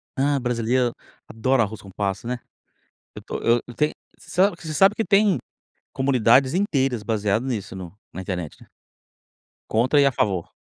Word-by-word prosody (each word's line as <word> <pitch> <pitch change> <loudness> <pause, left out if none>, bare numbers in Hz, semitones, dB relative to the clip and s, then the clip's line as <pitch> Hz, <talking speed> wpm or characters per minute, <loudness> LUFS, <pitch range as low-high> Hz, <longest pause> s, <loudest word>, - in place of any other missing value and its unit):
Ah, 140 +1 +2
brasíleiro 120 0 0 0.3
adora 120 +3 +1
arroz 110 0 -6
com 100 - -13
passa, 100 +3 -3
né, 125 0 -2 0.8
eu - - -8
tô - - -5
eu 115 0 +3
eu 120 - -9
tenho, 150 +3 +1 0.2
você - - -18
sabe 185 +2 +3
que - - -15
você 155 - -3
sabe 195 +6 +5
que 225 - -1
tem 200 -2 +4 0.6
comunidades 130 0 +3
inteiras 135 - 0
baseado 105 +1 0
nisso 110 -7 -4
no 90 -3 -8 0.2
na 90 - -6
internet 90 +2 -5 1.1
contra 125 +6 +3
e 140 - +6
a 140 - +4
favor, 95 -8 -1
120 Hz, 170 wpm, -23 LUFS, 105-140 Hz, 1.1 s, e